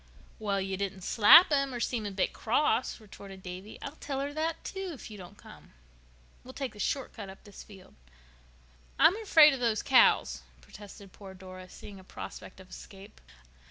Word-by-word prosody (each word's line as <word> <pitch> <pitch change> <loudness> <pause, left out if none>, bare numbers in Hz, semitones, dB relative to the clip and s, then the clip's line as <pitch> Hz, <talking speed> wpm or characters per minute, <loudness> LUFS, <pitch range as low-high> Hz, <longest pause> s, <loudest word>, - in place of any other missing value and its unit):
"Well, 200 -2 -1
you 190 0 -3
didn't 195 -1 -4
slap 230 - +7
him 275 -3 0
or - - -4
seem 235 -3 -2
a - - -5
bit 190 -1 -1
cross," 245 +2 0
retorted 195 -3 -13
Davy. 185 +3 -9
"I'll 280 +3 -8
tell 275 -2 -5
her 285 +1 -4
that, 320 +2 -3
too, 385 -1 -6
if 255 - -11
you 210 - -9
don't 180 -1 -12
come. - - -16 0.7
We'll 260 +1 -13
take 270 -3 -5
the 210 - -15
short 270 +5 -2
cut 205 -4 -9
up 190 - -13
this 205 -2 -13
field." 195 -3 -16 1.0
"I'm 355 - +5
afraid 315 -8 +6
of 270 - -4
those 230 -3 0
cows," 260 - +3 0.2
protested 200 -2 -14
poor 195 -2 -12
Dora, 185 0 -12
seeing 200 +1 -12
a - - -15
prospect 190 - -10
of 185 -1 -16
escape. 195 +3 -13
210 Hz, 185 wpm, -29 LUFS, 190-270 Hz, 1.0 s, slap